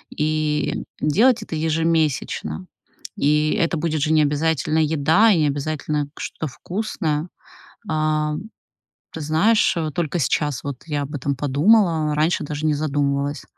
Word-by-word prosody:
и 150 -1 -1 0.2
делать 225 - +3
это 165 - -6
ежемесячно. 155 - -1 0.5
И 150 +1 +2
это 170 -4 0
будет 155 -1 -1
же 155 +1 +1
не 155 - +5
обязательно 155 +1 0
еда 160 +8 +4
и 180 - +3
не 150 - +3
обязательно 145 0 -2
что-то 160 - -4
вкусное. 175 - -3 0.6
А, 155 -1 0 0.8
ты 160 - -7
знаешь, 190 +7 +3
вот 155 -3 -2
только 170 0 -1
сейчас 145 -1 0
вот 140 -3 -6
я 145 -2 -2
об 140 +2 -7
этом 140 0 -2
подумала, 155 - +3
а - - -1
раньше 155 +2 +1
даже 150 +1 -3
не 150 - +2
задумывалась. 145 -1 -1
155 Hz, 140 wpm, -22 LUFS, 145-160 Hz, 0.8 s, не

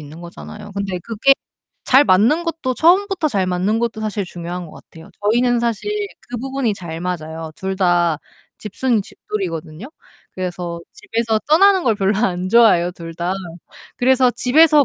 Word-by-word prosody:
있는 150 +3 -11
거잖아요. 170 - -10
근데 195 -2 -3
그게 230 +4 +3 0.5
잘 270 +2 +6
맞는 230 - +4
것도 325 -6 -2
처음부터 360 +1 +3
잘 195 -7 0
맞는 185 +5 0
것도 230 -2 -2
사실 210 -2 -2
중요한 175 0 -6
것 - - -14
같아요. 165 0 -14
저희는 240 +3 +2
사실 235 - -2 0.4
그 245 - -5
부분이 265 -4 -1
잘 165 -3 -7
맞아요. 160 -2 -5
둘 190 0 -4
다 175 -4 +2 0.4
집순이 225 +2 0
집돌이거든요. 175 -2 -6 0.5
그래서 175 -2 -5
집에서 230 - -1
떠나는 380 +4 +5
걸 225 -3 +2
별로 195 0 +1
안 185 -4 0
좋아해요, 200 -7 +5
둘 165 -1 -9
다. 175 +2 -2 0.6
그래서 255 0 +4
집에서 295 +4 +5
205 Hz, 330 characters per minute, -19 LUFS, 175-250 Hz, 0.6 s, 잘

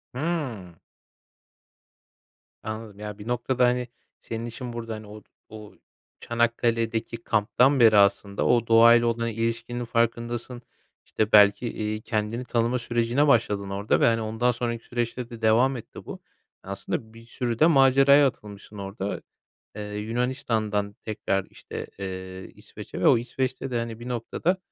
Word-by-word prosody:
Hıı. 130 - -3 1.9
Anladım, 110 -2 -7
ya, 105 -1 -6
bir 105 +1 -10
noktada, 125 +1 +1
hani, 125 0 +1 0.3
senin 115 0 -6
işin 120 +1 -7
burada, 115 -1 -5
hani, 110 -1 -10
o 105 +1 -11 0.3
o 105 -1 -11 0.5
Çanakkale'deki 115 -1 0
kamptan 125 +6 +2
beri 110 -3 +6
aslında, 100 0 +2
o 120 -1 +3
doğayla 115 +1 +6
olan 115 0 0
ilişkinin 115 +2 -3
farkındasın. 120 +1 -2 0.4
İşte, 110 0 -1
belki, 105 +3 +6
iii, 110 -1 -3
kendini 110 +2 -2
tanıma 120 +1 0
sürecine 120 +4 +1
başladın 105 -6 +2
orada 100 +2 0
ve, - - +4
hani, 115 -1 +3
ondan 110 +3 0
sonraki 115 -1 -4
süreçte 120 0 -3
de 115 -2 -10
devam 120 +4 +3
etti 115 - -11
bu. - - -8 0.4
Aslında, 100 +3 -5
bir 115 0 -14
sürü 120 0 -3
de - - +6
maceraya 140 -1 +6
atılmışsın 105 -3 -9
orada, 100 0 -5 0.6
eee, 105 0 -6
Yunanistan'dan 110 -3 -1
tekrar, 95 -3 -2
işte, - - -8
eee, 95 -1 -7
İsveç'e - - -10
ve - - +2
o - - +6
İsveç'te 130 +2 -3
de, 120 - -1
hani, 115 -1 -5
bir 120 - -7
noktada, 125 +9 -1
115 Hz, 140 wpm, -25 LUFS, 105-120 Hz, 1.9 s, beri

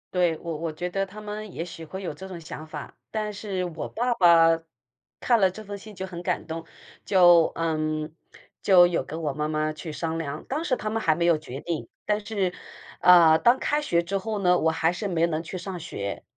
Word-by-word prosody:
对， 175 -3 +2
我 165 -2 -5
我 160 0 -4
觉 175 +3 -4
得 195 +2 -1
他 200 +3 -11
们 210 -1 -7
也 165 - -3
许 165 -1 -9
会 190 +5 -7
有 175 - -3
这 190 +6 -9
种 185 -2 -7
想 155 0 -8
法， - - -8 0.2
但 215 -1 -2
是 200 -2 -4
我 170 -3 -4
爸 245 +2 0
爸 165 -4 +6 0.6
看 235 -2 +3
了 190 -2 +5
这 215 +4 -9
封 205 0 -7
信 210 +1 -12
就 190 - -4
很 175 -2 -7
感 180 0 -2
动， 165 0 -5 0.4
就 175 -4 +6
嗯， 155 -1 -1 0.5
就 180 -3 +7
有 175 - 0
跟 160 +2 -6
我 150 -3 -1
妈 150 +2 -2
妈 155 0 0
去 155 +1 -7
商 165 +1 -3
量， 150 -2 -4
当 305 +5 -2
时 265 - +2
他 215 - -4
们 225 +1 -1
还 160 -5 +3
没 170 - 0
有 170 -2 +4
决 140 -3 -8
定， 170 -3 -4 0.2
但 210 0 +1
是， 195 -5 -1 0.5
呃， 170 -3 +7
当 240 +2 +5
开 295 +2 0
学 170 -11 +1
之 195 +4 -2
后 210 +2 -3
呢， 180 -2 +3
我 160 - +3
还 160 +1 +1
是 200 +4 -4
没 170 -3 +2
能 160 -1 -2
去 170 +3 -7
上 180 0 -6
学。 100 - -5
175 Hz, 240 characters per minute, -26 LUFS, 160-195 Hz, 0.6 s, 就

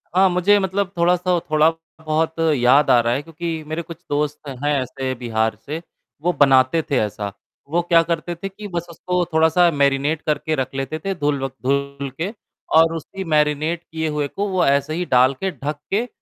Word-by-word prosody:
हाँ, 190 +1 +5
मुझे 180 +3 +4
मतलब 190 0 -1
थोड़ा-सा 180 +1 +2
थोड़ा 155 +1 +5 0.4
बहुत 160 +1 0 0.2
याद 135 +3 +4
आ 125 - +6
रहा 120 0 +1
है 135 - -1
क्योंकि 165 0 -5
मेरे 155 +2 -3
कुछ 170 -1 -10
दोस्त 150 0 -2 0.2
हैं 145 - +2
ऐसे 130 +1 -4
बिहार 110 -3 -1
से, 155 +3 -4 0.4
वो 175 +2 +1
बनाते 135 +1 +4
थे 135 - +3
ऐसा, 105 -1 -3 0.4
वो 170 +3 +1
क्या 170 -1 +4
करते 170 +1 -3
थे 195 +4 -6
कि 205 +2 -9
बस 175 -2 -4
उसको 180 +1 -1
थोड़ा-सा 160 +2 +4
मैरिनेट 140 +1 +1
करके 155 +1 -1
रख 130 -2 -3
लेते 135 +3 -3
थे 195 - 0
धुल 145 -4 -1
व - - +1 0.2
धुल 140 +1 -1
के 190 +6 -2 0.4
और 165 0 +5
उसकी 190 +4 -6
मैरिनेट 155 +1 +1
किए 160 -1 -4
हुए 150 -1 -1
को 200 +8 -3
वो 185 -1 +2
ऐसे 140 +2 +2
ही 175 +2 -2
डाल 130 +2 +5
के, 190 +8 -3
ढक 145 0 -5
के 220 +5 +1
155 Hz, 190 wpm, -21 LUFS, 140-175 Hz, 0.4 s, आ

